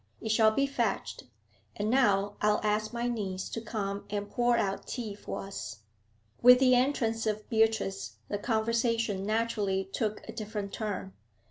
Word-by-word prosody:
'It -, -, -5 dB
shall 220 Hz, 0 st, +5 dB
be 275 Hz, +6 st, +1 dB
fetched. 235 Hz, -7 st, -2 dB, 0.5 s
And 210 Hz, +2 st, -1 dB
now 205 Hz, -6 st, +3 dB
I'll 210 Hz, 0 st, +3 dB
ask 215 Hz, 0 st, 0 dB
my 240 Hz, 0 st, -2 dB
niece 195 Hz, -6 st, -3 dB
to 225 Hz, -, -4 dB
come 205 Hz, -3 st, -4 dB
and 205 Hz, 0 st, -3 dB
pour 240 Hz, 0 st, +2 dB
out 200 Hz, -3 st, -1 dB
tea 230 Hz, -5 st, -4 dB
for 205 Hz, -, -6 dB
us.' 115 Hz, -, -7 dB, 0.6 s
With 250 Hz, +1 st, +9 dB
the 255 Hz, -1 st, +5 dB
entrance 245 Hz, -3 st, +1 dB
of 215 Hz, 0 st, -2 dB
Beatrice 115 Hz, -, +1 dB
the 205 Hz, -, -3 dB
conversation 230 Hz, -2 st, 0 dB
naturally 215 Hz, -3 st, 0 dB
took 215 Hz, -3 st, -2 dB
a -, -, -5 dB
different 210 Hz, -3 st, -5 dB
turn. 200 Hz, -3 st, -4 dB
215 Hz, 155 wpm, -30 LUFS, 200-230 Hz, 0.6 s, With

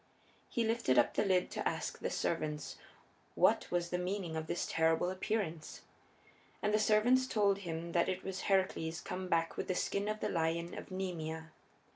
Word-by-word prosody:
He 235 Hz, -, 0 dB
lifted 225 Hz, -, +2 dB, 0.2 s
the -, -, +2 dB
lid 185 Hz, -3 st, +3 dB
up -, -, -15 dB
to -, -, 0 dB
ask -, -, -4 dB
the -, -, -2 dB
servants 150 Hz, -3 st, -2 dB, 0.6 s
what -, -, +3 dB
was 175 Hz, -1 st, -1 dB
the 180 Hz, -, 0 dB
meaning 180 Hz, -2 st, -2 dB
of 160 Hz, 0 st, -3 dB
this 175 Hz, -, -1 dB
terrible 165 Hz, +2 st, +2 dB
appearance. 185 Hz, -4 st, -3 dB, 0.8 s
And 210 Hz, 0 st, 0 dB
the 215 Hz, -, +4 dB
servants 230 Hz, +5 st, +4 dB
told 200 Hz, -4 st, +2 dB
him 170 Hz, -2 st, -4 dB
that 170 Hz, +2 st, +2 dB
it 185 Hz, 0 st, -2 dB
was 190 Hz, -1 st, -4 dB
Heracles 185 Hz, -4 st, +1 dB
come 185 Hz, +2 st, -5 dB
back 165 Hz, -2 st, +1 dB
with -, -, -3 dB
the 185 Hz, -, 0 dB
skin 200 Hz, +3 st, -1 dB
of 215 Hz, 0 st, -2 dB
the -, -, -1 dB
lion 170 Hz, 0 st, -1 dB
of -, -, -8 dB
Nemea. 160 Hz, -4 st, -4 dB
180 Hz, 180 wpm, -34 LUFS, 165-200 Hz, 0.8 s, the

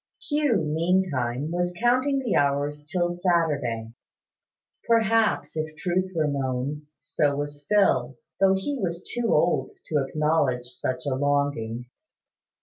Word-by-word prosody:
Hugh, 295 Hz, -7 st, +1 dB
meantime, 155 Hz, -5 st, 0 dB
was 175 Hz, 0 st, -1 dB
counting 255 Hz, +4 st, +2 dB
the 255 Hz, -6 st, -1 dB
hours 145 Hz, +1 st, +1 dB
till 175 Hz, -1 st, 0 dB
Saturday. 145 Hz, -11 st, 0 dB, 0.9 s
Perhaps, 225 Hz, -3 st, +2 dB
if 155 Hz, 0 st, -1 dB
the 155 Hz, -, -16 dB
truth 185 Hz, +3 st, 0 dB
were 160 Hz, -2 st, +2 dB
known, 140 Hz, +1 st, -2 dB
so 145 Hz, 0 st, 0 dB
was 145 Hz, 0 st, -5 dB
Phil, 135 Hz, -12 st, +3 dB, 0.2 s
though 195 Hz, 0 st, +5 dB
he 265 Hz, +9 st, -3 dB
was 175 Hz, -2 st, -3 dB
too 240 Hz, -2 st, -2 dB
old -, -, +2 dB, 0.2 s
to 150 Hz, -3 st, +2 dB
acknowledge 145 Hz, -3 st, +1 dB
such 125 Hz, 0 st, -4 dB
a 140 Hz, -, 0 dB
longing. 140 Hz, -4 st, 0 dB
155 Hz, 130 wpm, -25 LUFS, 140-190 Hz, 0.9 s, though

